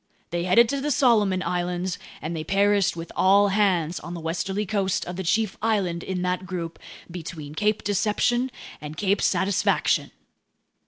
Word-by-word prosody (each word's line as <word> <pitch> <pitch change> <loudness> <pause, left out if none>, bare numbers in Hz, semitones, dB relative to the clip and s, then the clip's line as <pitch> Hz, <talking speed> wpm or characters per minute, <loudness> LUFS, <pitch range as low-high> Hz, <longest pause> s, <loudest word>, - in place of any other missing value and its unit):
They 175 0 -1
headed 230 +6 +5
to 280 +1 -1
the 295 - -1
Solomon 215 -9 +3
Islands, 180 0 -2 0.2
and 165 +2 -3
they 155 - -3
perished 200 +2 +2
with 165 0 -7
all 200 +2 +5
hands 180 -5 +1
on 175 +2 -7
the - - -5
westerly 185 +5 -2
coast 195 -2 -1
of 180 - -6
the 190 - -4
chief 205 +3 0
island 195 -6 0
in 180 0 -3
that 180 +1 -2
group, 170 -2 -5 0.3
between 160 -4 -7
Cape 210 +5 0
Deception 215 +5 +1 0.3
and 150 +1 -8
Cape 200 +1 +1
Satisfaction!" 190 -1 +1
190 Hz, 160 wpm, -25 LUFS, 175-205 Hz, 0.3 s, headed